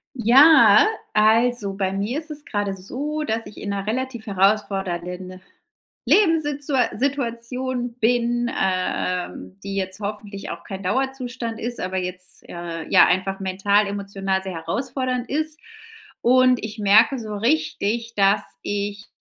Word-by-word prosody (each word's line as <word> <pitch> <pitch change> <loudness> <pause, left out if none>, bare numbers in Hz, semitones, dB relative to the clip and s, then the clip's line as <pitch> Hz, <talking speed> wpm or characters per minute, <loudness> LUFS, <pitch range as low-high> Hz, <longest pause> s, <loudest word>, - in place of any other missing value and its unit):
Ja, 275 - +7 0.3
also, 220 0 +3
bei 195 -1 -2
mir 210 +9 -2
ist 320 -1 -8
es 295 -1 -4
gerade 205 -2 -2
so, 285 +11 -4
dass 225 -3 -2
ich - - -12
in 205 - -6
'ner 200 0 -3
relativ 245 0 -3
herausfordernden 185 -2 -1 0.7
Lebenssitzua 295 -8 +2
Situation 250 -1 -2
bin, 240 0 +1
äh, 185 -2 -1
ähm, 185 - -11
die 200 0 -5
jetzt 190 +1 -3
hoffentlich 205 -1 -6
auch - - -7
kein 195 -1 -7
Dauerzustand 250 +1 -3
ist, 240 +1 -1
aber 185 +1 -3
jetzt, 180 0 -4
äh, 170 -1 -6
ja, - - +7
einfach 185 +2 0
mental 195 +2 +1
emotional 195 -1 -2
sehr 190 -1 -6
herausfordernd 250 +9 -3
ist. 310 +2 -2 0.6
Und 255 0 +4
ich 220 0 -6
merke 215 +6 +5
so 215 -3 -5
richtig, 230 -3 -1
dass 200 +1 +4 0.2
ich, 205 +1 -4
215 Hz, 135 wpm, -22 LUFS, 195-250 Hz, 0.7 s, Ja